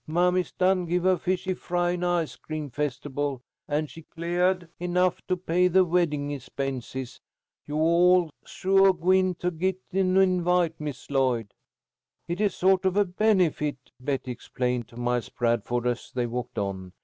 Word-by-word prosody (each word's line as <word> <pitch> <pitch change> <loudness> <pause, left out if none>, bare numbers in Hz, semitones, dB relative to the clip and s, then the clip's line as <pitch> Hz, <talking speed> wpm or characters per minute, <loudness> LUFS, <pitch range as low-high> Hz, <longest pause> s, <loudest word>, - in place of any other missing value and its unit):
Mammy's 180 +3 +1
done 185 -1 +2
give 175 +1 0
her 185 0 +4
fish 185 +1 -2
fry 175 0 0
and 180 0 -3
ice 175 -3 0
cream 155 -3 -6
festible, 145 -1 -3 0.2
and 150 +1 0
she 155 +5 -12
cleahed 175 +3 -1
enough 180 +1 +1
to 185 - +1
pay 180 0 +2
the 185 +1 +4
weddin' 155 -5 0
expenses. 130 -1 -5 0.5
You 150 - -4
all's 170 +1 +4
suah 195 0 +3
gwine 185 +1 +2
to 180 +1 -2
git 185 +3 -1
an 190 0 +2
invite, 180 -3 +2
Miss 145 -2 -6
Lloyd." 125 -6 +1 0.7
"It 175 +4 -3
is 205 -4 +1
sort 190 0 +3
of 190 +1 +1
a 205 - +4
benefit," 180 -7 +1 0.2
Betty 130 -1 -2
explained 125 0 -3
to 120 - -15
Miles 120 -1 -1
Bradford, 120 +1 0
as 120 -1 -2
they 125 -1 -1
walked 120 +1 -5
on. 95 -2 -3
170 Hz, 155 wpm, -26 LUFS, 130-180 Hz, 0.7 s, her